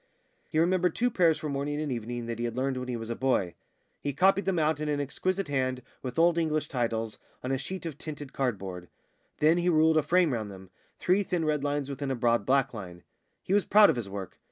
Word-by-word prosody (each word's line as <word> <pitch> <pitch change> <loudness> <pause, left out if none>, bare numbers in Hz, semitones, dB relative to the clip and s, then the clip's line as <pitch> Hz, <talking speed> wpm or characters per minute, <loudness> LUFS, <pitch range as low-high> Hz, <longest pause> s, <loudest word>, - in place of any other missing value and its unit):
He 155 - -2
remembered 180 +2 +2
two 245 +1 +1
prayers 170 -6 +3
for 155 -1 -5
morning 145 +1 -2
and 150 -2 -2
evening 120 0 -4
that 115 0 -4
he 120 - -1
had 120 0 -4
learned 135 +1 0
when 125 0 -4
he 125 -2 -2
was 115 0 -5
a - - -2
boy. 120 -10 +1 0.5
He 145 - -3
copied 190 +6 +3
them 190 -2 +1
out 155 -1 +2
in 150 0 -2
an 145 -1 0
exquisite 185 +7 -1
hand, 130 -3 -1 0.2
with 125 -2 -6
Old 170 +1 +4
English 155 -2 0
titles, 115 -3 -2 0.2
on 125 - -2
a 135 - +1
sheet 185 +6 -6
of 155 -3 -6
tinted 145 -3 -7
cardboard. 95 -9 -3 0.5
Then 160 +3 +4
he 175 +1 +2
ruled 160 -1 +4
a - - +5
frame 175 -1 +3
round 110 -3 -3
them 95 -1 -12 0.3
three 185 +3 +2
thin 180 -4 -1
red 150 -2 0
lines 145 -1 -1
within 140 0 -4
a 135 - 0
broad 115 -3 +1
black 135 -1 +2
line. 90 -5 -8 0.4
He 190 - -1
was 205 -1 +4
proud 210 0 +6
of - - -3
his 115 -5 -4
work. 95 -2 -7
140 Hz, 235 wpm, -28 LUFS, 120-160 Hz, 0.5 s, proud